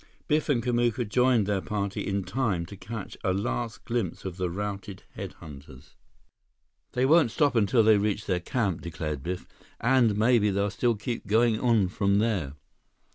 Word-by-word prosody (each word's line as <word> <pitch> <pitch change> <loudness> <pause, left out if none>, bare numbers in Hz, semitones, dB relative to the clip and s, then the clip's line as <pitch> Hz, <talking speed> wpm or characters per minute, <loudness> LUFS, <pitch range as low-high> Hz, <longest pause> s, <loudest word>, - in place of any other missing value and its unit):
Biff 155 +1 +1
and 120 -5 +2
Kamuka 120 -1 +1
joined 125 -1 +3
their 100 -1 0
party 100 -1 -3
in 100 -1 -1
time 105 -7 -1
to 100 - -10
catch 105 0 -7
a 95 - +1
last 115 +3 -3
glimpse 115 -9 -3
of 95 -2 -5
the 90 -2 -1
routed 100 +1 -5
head - - -7
hunters. 70 -3 -13 1.0
"They 125 +1 +2
won't 155 -2 +5
stop 135 +4 +1
until 115 +1 +4
they 110 -1 +6
reach 105 0 -1
their 90 -2 0
camp," 95 -2 -1
declared 80 -4 -4
Biff, 90 +5 -4 0.3
"and 120 -4 +3
maybe 110 -1 +4
they'll 100 +1 0
still 120 +3 +1
keep 115 +3 -4
on - - -13 0.2
going 110 -3 +2
from 100 +1 +1
there." 100 -10 0
105 Hz, 170 wpm, -27 LUFS, 95-120 Hz, 1.0 s, they